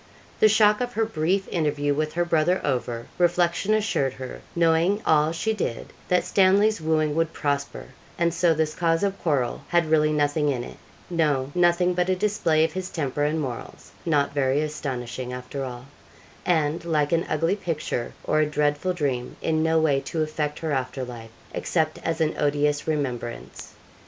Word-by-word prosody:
The 215 Hz, -, +6 dB
shock 210 Hz, +1 st, +4 dB
of 245 Hz, 0 st, -2 dB
her 225 Hz, 0 st, +1 dB
brief 190 Hz, 0 st, 0 dB
interview 150 Hz, -4 st, 0 dB
with 155 Hz, +1 st, -2 dB
her 175 Hz, +1 st, +1 dB
brother 170 Hz, +2 st, +2 dB
over, 120 Hz, -4 st, -2 dB
reflection 175 Hz, +4 st, +2 dB
assured 170 Hz, -, 0 dB
her, 130 Hz, -1 st, -8 dB
knowing 170 Hz, +4 st, +3 dB
all 155 Hz, 0 st, +4 dB
she 220 Hz, +7 st, -1 dB
did, 155 Hz, -, -4 dB
that 180 Hz, 0 st, +2 dB
Stanley's 200 Hz, +1 st, +3 dB
wooing 155 Hz, -1 st, +1 dB
would 165 Hz, 0 st, 0 dB
prosper, 140 Hz, -1 st, -2 dB, 0.3 s
and 170 Hz, -1 st, +1 dB
so 170 Hz, -1 st, +3 dB
this 155 Hz, 0 st, 0 dB
cause 165 Hz, +1 st, +1 dB
of 200 Hz, -1 st, -1 dB
quarrel 140 Hz, -7 st, 0 dB
had 170 Hz, -2 st, +1 dB
really 155 Hz, -1 st, +4 dB
nothing 150 Hz, 0 st, +1 dB
in 125 Hz, -4 st, -1 dB
it; -, -, -10 dB, 0.3 s
no, 145 Hz, -5 st, +1 dB
nothing 175 Hz, 0 st, +3 dB
but 180 Hz, +1 st, 0 dB
a 185 Hz, -, +3 dB
display 180 Hz, -5 st, +2 dB
of 160 Hz, -1 st, 0 dB
his 185 Hz, 0 st, -4 dB
temper 145 Hz, -4 st, -2 dB
and 155 Hz, +2 st, 0 dB
morals 130 Hz, -6 st, -6 dB
not 145 Hz, -5 st, +1 dB
very 140 Hz, 0 st, +1 dB
astonishing, 130 Hz, -5 st, -4 dB
after 125 Hz, +2 st, -5 dB
all 125 Hz, -1 st, -7 dB, 0.6 s
and, 160 Hz, -1 st, +1 dB
like 150 Hz, -3 st, 0 dB
an 165 Hz, 0 st, +1 dB
ugly 165 Hz, +5 st, +1 dB
picture 165 Hz, -, -3 dB
or 155 Hz, -, +1 dB
a 155 Hz, -, +4 dB
dreadful 150 Hz, +4 st, 0 dB
dream, 135 Hz, -7 st, -2 dB
in 160 Hz, -1 st, 0 dB
no 160 Hz, 0 st, +2 dB
way 155 Hz, -4 st, +3 dB
to 155 Hz, +3 st, -2 dB
affect 150 Hz, -1 st, -3 dB
her 160 Hz, -2 st, -3 dB
after 130 Hz, -1 st, -2 dB
life, 120 Hz, -2 st, -8 dB, 0.2 s
except 155 Hz, -2 st, -1 dB
as 165 Hz, 0 st, -2 dB
an 160 Hz, -1 st, +1 dB
odious 145 Hz, 0 st, +1 dB
remembrance. 130 Hz, -6 st, -4 dB
155 Hz, 175 wpm, -25 LUFS, 145-175 Hz, 0.6 s, The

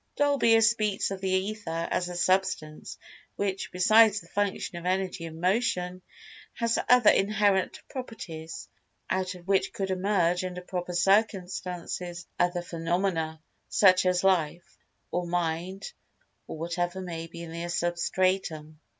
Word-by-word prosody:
Dolbear 255 Hz, -6 st, +4 dB
speaks 215 Hz, -3 st, +2 dB
of 195 Hz, -1 st, -5 dB
the 190 Hz, -, -1 dB
Ether 185 Hz, -3 st, -1 dB
as 180 Hz, 0 st, 0 dB
a 180 Hz, -, -6 dB
substance, 185 Hz, -4 st, 0 dB, 0.4 s
which, 195 Hz, -1 st, -2 dB
besides 215 Hz, +3 st, +5 dB
the -, -, -15 dB
function 200 Hz, -3 st, -2 dB
of 175 Hz, -, -6 dB
energy 185 Hz, -2 st, -1 dB
and 160 Hz, 0 st, -8 dB
motion, 185 Hz, -2 st, 0 dB, 0.5 s
has 230 Hz, -1 st, 0 dB
other 250 Hz, -3 st, +7 dB
inherent 200 Hz, -1 st, +2 dB
properties 165 Hz, -11 st, -7 dB, 0.4 s
"out 185 Hz, 0 st, -1 dB
of 180 Hz, 0 st, -14 dB
which 195 Hz, -1 st, +2 dB
could 195 Hz, -1 st, -2 dB
emerge, 185 Hz, -2 st, +1 dB
under 180 Hz, -1 st, -5 dB
proper 180 Hz, 0 st, -4 dB
circumstances, 180 Hz, -2 st, 0 dB
other 175 Hz, 0 st, +1 dB
phenomena, 165 Hz, -1 st, -1 dB, 0.3 s
such 185 Hz, -2 st, +5 dB
as 180 Hz, 0 st, +2 dB
life, 175 Hz, -3 st, +1 dB, 0.4 s
or 175 Hz, 0 st, -1 dB
mind 175 Hz, -, -2 dB, 0.5 s
or -, -, -6 dB
whatever 175 Hz, +3 st, -2 dB
may 165 Hz, -3 st, -5 dB
be 170 Hz, +1 st, -9 dB
in 165 Hz, -, -8 dB
the 170 Hz, +1 st, -4 dB
substratum." 175 Hz, -2 st, -1 dB
185 Hz, 135 wpm, -28 LUFS, 175-195 Hz, 0.5 s, other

